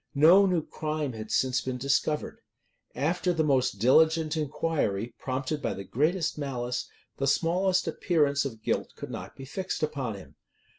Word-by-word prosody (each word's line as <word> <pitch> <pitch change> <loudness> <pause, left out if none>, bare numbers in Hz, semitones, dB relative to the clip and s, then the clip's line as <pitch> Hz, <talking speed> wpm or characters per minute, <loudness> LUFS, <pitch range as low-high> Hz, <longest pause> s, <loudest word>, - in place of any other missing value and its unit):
No 175 +8 +7
new 175 -4 0
crime 155 -3 -3
had 110 -1 -7
since 130 -1 +1
been 130 -1 -3
discovered. 140 +3 0 0.6
After 175 +6 0
the 160 -2 +1
most 135 -4 +2
diligent 160 +7 +4
inquiry, 145 -8 -1
prompted 135 +3 -3
by - - -2
the 100 - -6
greatest 155 - 0
malice, 125 -3 -3 0.3
the 135 - -1
smallest 180 +6 +2
appearance 150 -4 +1
of 110 -5 -6
guilt - - -1
could - - -8
not - - -7
be 135 - -9
fixed 185 +4 -4
upon 140 -8 -2
him. 95 - -13
145 Hz, 155 wpm, -28 LUFS, 130-160 Hz, 0.6 s, No